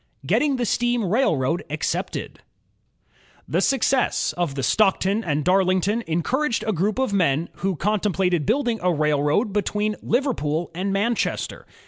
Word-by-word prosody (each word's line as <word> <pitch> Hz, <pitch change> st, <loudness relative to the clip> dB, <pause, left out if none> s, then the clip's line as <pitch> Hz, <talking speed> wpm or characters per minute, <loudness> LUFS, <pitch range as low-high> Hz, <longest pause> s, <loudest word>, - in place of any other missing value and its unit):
Getting 290 Hz, -2 st, +2 dB
the 245 Hz, -1 st, -1 dB
Steam 240 Hz, 0 st, 0 dB
Railroad 175 Hz, -, +1 dB
Accepted -, -, -3 dB, 1.1 s
The -, -, 0 dB
success 270 Hz, -1 st, +1 dB
of 170 Hz, -6 st, -2 dB
the 135 Hz, -, -3 dB
Stockton 195 Hz, -, +2 dB
and 150 Hz, -4 st, -1 dB
Darlington 190 Hz, +4 st, +2 dB
encouraged 235 Hz, -, 0 dB
a 215 Hz, -, 0 dB
group 200 Hz, +6 st, 0 dB
of 260 Hz, -6 st, 0 dB
men 165 Hz, -4 st, +1 dB
who 190 Hz, 0 st, -1 dB
contemplated 190 Hz, -3 st, 0 dB
building 240 Hz, -5 st, +1 dB
a 180 Hz, 0 st, +2 dB
railroad 150 Hz, -, +1 dB
be 205 Hz, -, +2 dB
tween 210 Hz, +2 st, -1 dB
Liverpool 175 Hz, -, -1 dB
and 190 Hz, +4 st, -2 dB
Manchester. 210 Hz, +4 st, -1 dB
195 Hz, 135 wpm, -23 LUFS, 170-230 Hz, 1.1 s, Getting